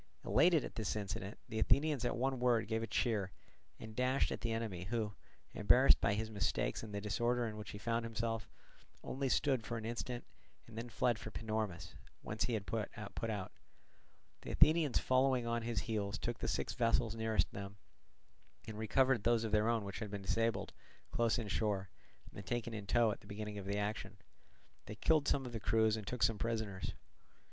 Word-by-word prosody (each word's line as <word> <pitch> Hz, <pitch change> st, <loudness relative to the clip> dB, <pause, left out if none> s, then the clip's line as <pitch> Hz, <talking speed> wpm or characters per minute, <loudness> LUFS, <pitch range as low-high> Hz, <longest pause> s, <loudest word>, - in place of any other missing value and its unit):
Elated 165 Hz, -3 st, +4 dB
at -, -, -7 dB
this 110 Hz, -3 st, -2 dB
incident, 100 Hz, -1 st, -4 dB
the 110 Hz, -, -3 dB
Athenians 145 Hz, +2 st, +3 dB
at 120 Hz, -, 0 dB
one 130 Hz, +1 st, 0 dB
word 120 Hz, -3 st, +3 dB
gave 110 Hz, 0 st, 0 dB
a 115 Hz, -, -3 dB
cheer, 105 Hz, -3 st, 0 dB, 0.5 s
and 110 Hz, -1 st, -9 dB
dashed 130 Hz, +2 st, +2 dB
at -, -, -3 dB
the 115 Hz, -, -1 dB
enemy, 110 Hz, -6 st, -3 dB
who, 110 Hz, 0 st, -1 dB, 0.4 s
embarrassed -, -, +6 dB
by 100 Hz, -, +3 dB
his 110 Hz, +1 st, -3 dB
mistakes 100 Hz, -1 st, 0 dB
and 110 Hz, -, -8 dB
the 100 Hz, -, -2 dB
disorder 120 Hz, +4 st, 0 dB
in 110 Hz, -2 st, -4 dB
which 105 Hz, -2 st, -7 dB
he -, -, -6 dB
found 115 Hz, +2 st, -1 dB
himself, 115 Hz, -1 st, -2 dB, 0.5 s
only 135 Hz, 0 st, -2 dB
stood 130 Hz, -3 st, +2 dB
for 115 Hz, +1 st, -3 dB
an 110 Hz, -, -5 dB
instant, 120 Hz, +1 st, -4 dB, 0.4 s
and 115 Hz, -, -13 dB
then 115 Hz, +2 st, -5 dB
fled 120 Hz, 0 st, +1 dB
for -, -, -6 dB
Panormus, 110 Hz, -6 st, -3 dB, 0.3 s
whence 105 Hz, 0 st, -1 dB
he 120 Hz, -, 0 dB
had 100 Hz, -2 st, -3 dB
put 110 Hz, -1 st, -2 dB
out. 105 Hz, -1 st, -4 dB, 0.9 s
The -, -, -7 dB
Athenians 155 Hz, -4 st, +4 dB
following 130 Hz, -1 st, +3 dB
on 115 Hz, 0 st, 0 dB
his 115 Hz, -1 st, -1 dB
heels 100 Hz, -3 st, -2 dB
took 120 Hz, -1 st, -3 dB
the -, -, -2 dB
six -, -, -1 dB
vessels 115 Hz, -2 st, +2 dB
nearest 110 Hz, -1 st, +1 dB
them, 100 Hz, 0 st, -7 dB, 0.9 s
and 110 Hz, -1 st, -6 dB
recovered 125 Hz, +1 st, +3 dB
those 115 Hz, -1 st, +3 dB
of 110 Hz, -, -2 dB
their 105 Hz, +1 st, +3 dB
own 115 Hz, -3 st, +1 dB
which 100 Hz, 0 st, -5 dB
had 110 Hz, -2 st, -4 dB
been 100 Hz, -1 st, -5 dB
disabled 115 Hz, +3 st, 0 dB, 0.4 s
close 115 Hz, -1 st, +2 dB
inshore 105 Hz, -3 st, -1 dB, 0.4 s
and 100 Hz, -, -7 dB
taken 120 Hz, +2 st, -2 dB
in 105 Hz, -2 st, -6 dB
tow 115 Hz, +1 st, +4 dB
at -, -, -6 dB
the -, -, -16 dB
beginning 105 Hz, 0 st, -5 dB
of 95 Hz, -, -7 dB
the 100 Hz, +1 st, -1 dB
action; 105 Hz, -1 st, -3 dB, 0.7 s
they 105 Hz, -, -6 dB
killed 155 Hz, +6 st, +3 dB
some 135 Hz, -2 st, +2 dB
of 125 Hz, -, -5 dB
the 115 Hz, -, -4 dB
crews 110 Hz, 0 st, +3 dB
and 105 Hz, -3 st, -6 dB
took 125 Hz, +1 st, -1 dB
some 110 Hz, -2 st, +3 dB
prisoners. 110 Hz, -5 st, -2 dB
110 Hz, 195 wpm, -36 LUFS, 105-120 Hz, 0.9 s, embarrassed